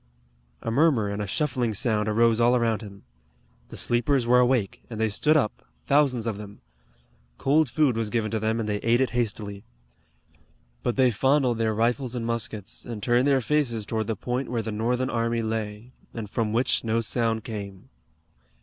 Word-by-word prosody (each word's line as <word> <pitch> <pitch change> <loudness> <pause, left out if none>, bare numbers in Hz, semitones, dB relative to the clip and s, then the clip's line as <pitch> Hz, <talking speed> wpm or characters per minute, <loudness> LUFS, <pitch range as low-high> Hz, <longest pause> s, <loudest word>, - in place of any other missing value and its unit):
A 115 - -2
murmur 135 -5 +3
and 100 +1 -3
a 105 - -3
shuffling 120 -2 -1
sound 105 -1 +1
arose 115 +1 +3
all 120 +1 +4
around 115 -2 +1
him. 100 -2 -11 0.7
The - - -8
sleepers 120 +2 +1
were 125 +1 +5
awake, 125 -5 +1
and 110 -2 -6
they 110 0 +2
stood 150 +9 +2
up, 110 -8 -1 0.2
thousands 140 -5 +2
of 110 -3 -3
them. 105 -1 -10 0.8
Cold 150 +1 +2
food 140 -1 +2
was 115 -2 -1
given 110 -1 -1
to 110 - 0
them, 110 +1 0
and 110 - -2
they 105 -1 0
ate 115 +2 +2
it 130 -3 +1
hastily. 105 -4 -3 1.2
But 120 - -1
they 130 -2 +4
fondled 130 +1 +2
their 110 -1 +1
rifles 120 +3 0
and 120 -2 -3
muskets, 110 -3 -4
and 110 -4 -7
turned 125 +2 +3
their 135 -2 +3
faces 120 -5 0
toward 110 0 -2
the 110 - -1
point 125 +5 -3
where 115 -2 -1
the 110 - -4
Northern 125 +4 -1
army 115 0 0
lay, 110 +1 -4 0.2
and 110 -3 -5
from 110 +1 -1
which 120 +4 +1
no 115 0 +1
sound 115 -1 0
came. 100 +1 -7
115 Hz, 185 wpm, -25 LUFS, 110-125 Hz, 1.2 s, were